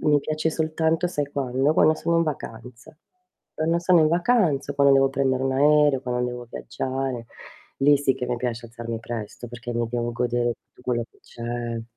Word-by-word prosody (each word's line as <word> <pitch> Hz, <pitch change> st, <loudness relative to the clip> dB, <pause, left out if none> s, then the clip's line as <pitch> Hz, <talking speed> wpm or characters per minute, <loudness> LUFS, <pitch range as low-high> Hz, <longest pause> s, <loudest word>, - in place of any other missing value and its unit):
mi 150 Hz, -1 st, +4 dB
piace 155 Hz, +2 st, -1 dB
soltanto, 160 Hz, +2 st, 0 dB
sai 145 Hz, -5 st, -2 dB
quando, 135 Hz, +1 st, +1 dB
quando 155 Hz, 0 st, +4 dB
sono 170 Hz, +2 st, 0 dB
in 165 Hz, -, +4 dB
vacanza. 125 Hz, -4 st, -7 dB, 0.6 s
Quando 165 Hz, +2 st, +1 dB
sono 175 Hz, -1 st, +4 dB
in 155 Hz, -, +4 dB
vacanza, 170 Hz, -, +2 dB
quando 140 Hz, 0 st, +5 dB
devo 135 Hz, 0 st, +4 dB
prendere 130 Hz, -1 st, 0 dB
un 135 Hz, 0 st, 0 dB
aereo, 145 Hz, 0 st, +4 dB
quando 125 Hz, -1 st, -1 dB
devo 120 Hz, 0 st, -7 dB
viaggiare. 130 Hz, -3 st, -4 dB, 0.5 s
Lì 145 Hz, +1 st, +5 dB
sì 135 Hz, -2 st, +2 dB
che 125 Hz, -, -4 dB
mi 125 Hz, 0 st, -1 dB
piace 120 Hz, -1 st, -3 dB
alzarmi 115 Hz, 0 st, -6 dB
presto 115 Hz, +1 st, -7 dB
perché 120 Hz, 0 st, -7 dB
mi 120 Hz, 0 st, -1 dB
devo 120 Hz, 0 st, -2 dB
godere 120 Hz, 0 st, 0 dB
tutto -, -, -25 dB
quello 120 Hz, -2 st, -1 dB
che -, -, -27 dB
c'è. 120 Hz, -1 st, -5 dB
130 Hz, 180 wpm, -24 LUFS, 120-150 Hz, 0.6 s, quando